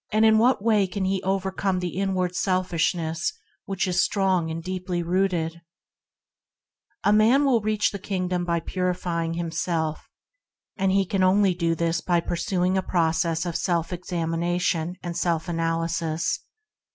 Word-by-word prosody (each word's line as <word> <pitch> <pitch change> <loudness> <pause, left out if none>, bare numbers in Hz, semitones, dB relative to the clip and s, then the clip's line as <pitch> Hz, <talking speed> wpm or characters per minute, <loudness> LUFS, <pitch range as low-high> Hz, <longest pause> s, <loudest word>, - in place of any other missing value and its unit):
In 220 0 +5
what 240 -2 +3
way 215 -4 +3
can 190 +1 -3
he 190 0 0
overcome 190 0 -1
the 180 -2 -3
inward 185 -2 0
selfishness 175 -3 0 0.3
which 195 -1 -1
is 185 0 +2
strong, 190 -5 +1
and 165 +1 -5
deeply 180 -1 -3
rooted? 170 -2 0 1.4
A 205 - +4
man 230 +7 +5
will 250 -5 +3
reach 210 0 +1
the 200 - -6
Kingdom 180 -2 -2
by 170 -1 0
purify 180 -1 -2
ing 165 0 -3
himself; 165 -1 -2 0.7
and 195 -1 +1
he 195 0 +3
can 190 +1 -1 0.3
do 170 -1 0
this 165 +1 0
only 175 -1 +3
by 170 - -8
pursuing 180 +2 0
a - - 0
process 165 -1 0
of 170 -2 -3
self 170 -1 0
examination 175 0 -1
and 175 -1 -4
self 170 -2 0
analysis. 165 -1 -1
180 Hz, 145 wpm, -25 LUFS, 165-190 Hz, 1.4 s, In